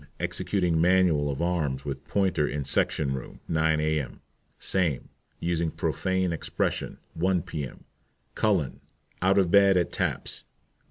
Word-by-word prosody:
Executing 90 Hz, -5 st, 0 dB
manual 90 Hz, -5 st, +4 dB
of 70 Hz, +3 st, -2 dB
arms 75 Hz, -7 st, -1 dB
with 70 Hz, -1 st, -5 dB
pointer 95 Hz, -7 st, +1 dB
in 70 Hz, 0 st, -2 dB
section 70 Hz, 0 st, +1 dB
room, 65 Hz, -2 st, -7 dB
9 80 Hz, -1 st, +2 dB
A.M. 75 Hz, -2 st, -1 dB, 0.4 s
SAME. 85 Hz, -8 st, 0 dB, 0.3 s
Using 85 Hz, -1 st, 0 dB
profane 95 Hz, +2 st, -1 dB
expression, 80 Hz, -, -2 dB, 0.2 s
1 90 Hz, 0 st, +1 dB
P.M. 70 Hz, -5 st, -6 dB, 0.5 s
CULLEN. 95 Hz, -10 st, +1 dB, 0.4 s
Out 95 Hz, +2 st, +3 dB
of 95 Hz, -4 st, +3 dB
bed 100 Hz, -1 st, +6 dB
at 85 Hz, -3 st, +1 dB
taps. -, -, -2 dB
85 Hz, 125 wpm, -27 LUFS, 75-95 Hz, 0.5 s, bed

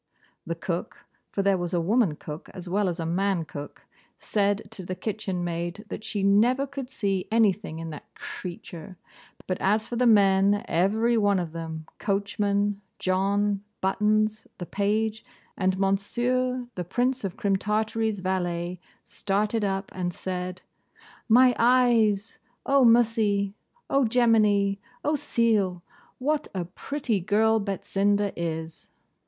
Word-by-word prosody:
The -, -, -2 dB
cook -, -, -5 dB, 0.2 s
(for 200 Hz, -, -1 dB
there 195 Hz, -1 st, +3 dB
was 175 Hz, +1 st, -2 dB
a -, -, +2 dB
woman 195 Hz, -1 st, +2 dB
cook 150 Hz, 0 st, -8 dB
as 185 Hz, -1 st, -8 dB
well 195 Hz, +2 st, +1 dB
as 175 Hz, 0 st, -4 dB
a 165 Hz, -, -2 dB
man 180 Hz, 0 st, 0 dB
cook) 145 Hz, -1 st, -9 dB, 0.3 s
said 205 Hz, -1 st, 0 dB
to 205 Hz, -4 st, -7 dB
the 185 Hz, +1 st, -4 dB
kitchen 190 Hz, -2 st, -3 dB
maid 175 Hz, +4 st, -4 dB
that -, -, -6 dB
she 210 Hz, -2 st, -3 dB
never 230 Hz, +7 st, +4 dB
could 275 Hz, -2 st, -7 dB
see 195 Hz, -7 st, -1 dB
anything 210 Hz, -7 st, +2 dB
in 165 Hz, 0 st, -6 dB
that 150 Hz, -, -10 dB
creetur: 175 Hz, 0 st, -8 dB, 0.5 s
but 185 Hz, -, -3 dB
as 215 Hz, +3 st, +2 dB
for 240 Hz, -, -4 dB
the 250 Hz, 0 st, +3 dB
men, 200 Hz, -1 st, +4 dB
every 220 Hz, +7 st, +2 dB
one 205 Hz, -2 st, +3 dB
of 175 Hz, -3 st, -3 dB
them, 160 Hz, -1 st, -6 dB
Coachman, 200 Hz, 0 st, 0 dB, 0.2 s
John, 200 Hz, +2 st, +1 dB, 0.2 s
Buttons, 215 Hz, +2 st, +1 dB
the 175 Hz, -, -5 dB
page, 215 Hz, +3 st, -1 dB, 0.3 s
and 190 Hz, -1 st, +1 dB
Monsieur, 245 Hz, +6 st, 0 dB
the 180 Hz, -, -4 dB
Prince 245 Hz, +8 st, 0 dB
of 190 Hz, -3 st, -4 dB
Crim 200 Hz, -1 st, +1 dB
Tartary's 215 Hz, 0 st, -1 dB
valet, 180 Hz, -1 st, -2 dB, 0.3 s
started 210 Hz, +2 st, -1 dB
up, 195 Hz, 0 st, -2 dB
and 180 Hz, -1 st, -2 dB
said 180 Hz, 0 st, -5 dB, 0.7 s
'My 250 Hz, +2 st, +6 dB
eyes!' 230 Hz, -4 st, +3 dB
} -, -, -44 dB
'O 275 Hz, -1 st, +4 dB
mussey!' 220 Hz, -4 st, +3 dB, 0.2 s
} 485 Hz, -, -39 dB
'What 255 Hz, -4 st, +1 dB, 2.4 s
a 180 Hz, -2 st, -2 dB
pretty 265 Hz, -6 st, -2 dB
girl 220 Hz, +4 st, +3 dB
Betsinda 200 Hz, 0 st, 0 dB
is! 160 Hz, -1 st, -5 dB
200 Hz, 135 wpm, -26 LUFS, 185-220 Hz, 2.4 s, My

